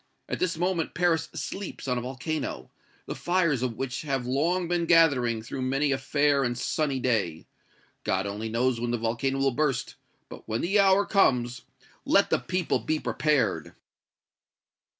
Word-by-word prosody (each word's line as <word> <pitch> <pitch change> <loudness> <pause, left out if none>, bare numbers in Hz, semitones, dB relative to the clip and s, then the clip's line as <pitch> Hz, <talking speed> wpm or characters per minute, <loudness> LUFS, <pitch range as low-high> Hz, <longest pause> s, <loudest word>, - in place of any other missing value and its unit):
At - - -3
this 185 -2 0
moment 175 -1 -1
Paris 165 -2 +1
sleeps 195 -7 -6
on 125 -1 0
a - - -5
volcano, 130 +5 -4 0.3
the - - -4
fires 170 -7 +1
of 125 -3 -2
which 135 -1 -3
have 135 -5 -2
long 165 +8 0
been 170 -1 0
gathering 135 -10 +4
through 130 +3 -5
many 135 +3 +1
a 135 - 0
fair 145 +1 +2
and 120 -1 -1
sunny 140 0 -1
day! 105 -11 -1 0.6
God 95 +1 0
only 105 +3 -4
knows 120 +1 0
when 120 - -1
the 120 - 0
volcano 115 +4 -1
will 135 0 +2
burst; 140 -1 -1 0.3
but, - - -12
when 110 +1 -1
the 195 +4 +2
hour 195 0 +5
comes, 125 - +2 0.4
let - - +3
the - - +3
people 180 -1 -1
be 155 0 -1
prepared!" 150 -3 0
135 Hz, 165 wpm, -27 LUFS, 120-165 Hz, 0.6 s, hour